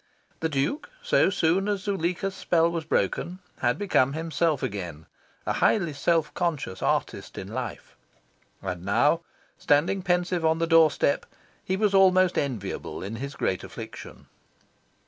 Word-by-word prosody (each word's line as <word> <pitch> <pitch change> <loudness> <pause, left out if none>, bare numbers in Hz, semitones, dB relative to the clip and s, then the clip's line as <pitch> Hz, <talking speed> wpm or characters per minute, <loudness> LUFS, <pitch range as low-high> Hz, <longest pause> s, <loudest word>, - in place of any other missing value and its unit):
The 160 - -1
Duke, 150 - -1
so 485 - +4
soon 185 +2 +1
as 200 -2 -1
Zuleika's 195 -1 -1
spell 170 -2 +2
was 165 -2 -3
broken, 175 +3 0 0.2
had 120 +1 +1
become 140 -9 +2
himself 160 -2 0
again 90 -6 -4 0.4
a - - 0
highly 175 -8 +2
self 160 +2 +1
conscious 155 - -2
artist - - -1
in - - -5
life. - - -6 0.7
And 90 -2 -4
now, 130 - +3 0.4
standing 155 +7 +2
pensive 180 -1 0
on 160 0 +3
the 165 - +1
doorstep, 160 -3 +3 0.4
he 190 - -1
was 210 -1 +2
almost 185 -2 +5
enviable 115 -12 -4
in 105 +4 -5
his 140 +3 -6
great 95 - -1
affliction. - - -9
165 Hz, 140 wpm, -26 LUFS, 140-185 Hz, 0.7 s, almost